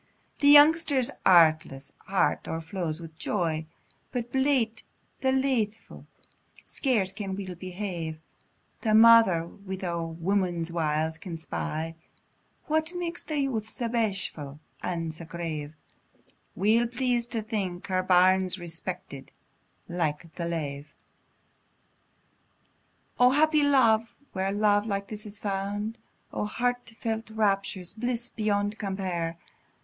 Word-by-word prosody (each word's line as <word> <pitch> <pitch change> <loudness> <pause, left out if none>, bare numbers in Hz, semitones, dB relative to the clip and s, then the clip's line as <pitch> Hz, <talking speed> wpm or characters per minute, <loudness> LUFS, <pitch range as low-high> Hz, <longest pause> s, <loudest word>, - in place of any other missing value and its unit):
The 285 - +3
youngster's 290 -3 +6 0.2
artless 160 -6 +4 0.2
heart 195 -1 +1
o'erflows 165 0 -3
wi' 165 -1 -9
joy, 160 -5 -1 0.4
But 240 -2 -3
blate 265 -4 +1 0.4
an' 265 0 +2
laithfu', 225 -5 -2 0.6
scarce 215 -9 0
can 195 -2 -4
weel 190 -2 -5
behave; 180 -3 -5 0.6
The 215 -2 +2
mother, 225 -7 +7
wi' 190 +2 -8
a 170 -1 -2
woman's 170 0 -1
wiles, 160 -1 -1
can 170 -2 -6
spy 155 - -4 0.7
What 315 +2 0
makes 345 -1 -4
the 310 - -3
youth 225 -6 -2
sae 235 0 -3
bashfu' 195 - -2 0.2
and 165 -3 -3
sae 165 +1 -10
grave, 160 -3 -5 0.8
Weel 220 +5 +3
pleas'd 245 -1 -1
to 225 -2 -1
think 195 -5 -3
her 185 -1 0
bairn's 185 0 +4
respected 170 -4 -7 0.6
like 165 -2 -2
the 170 0 -4
lave. 145 -4 -4 2.2
O 250 0 +7
happy 305 +3 +4
love! 230 -6 +3 0.2
where 190 0 -1
love 205 +1 +2
like 200 -1 -2
this 215 0 -7
is 205 0 -10
found: 205 +2 -3 0.3
O - - -1
heart 245 +2 -2
felt 225 -1 -3
raptures! 195 -4 -1
bliss 240 +1 -3
beyond 205 0 -1
compare! 185 -5 -2
195 Hz, 115 wpm, -27 LUFS, 170-230 Hz, 2.2 s, mother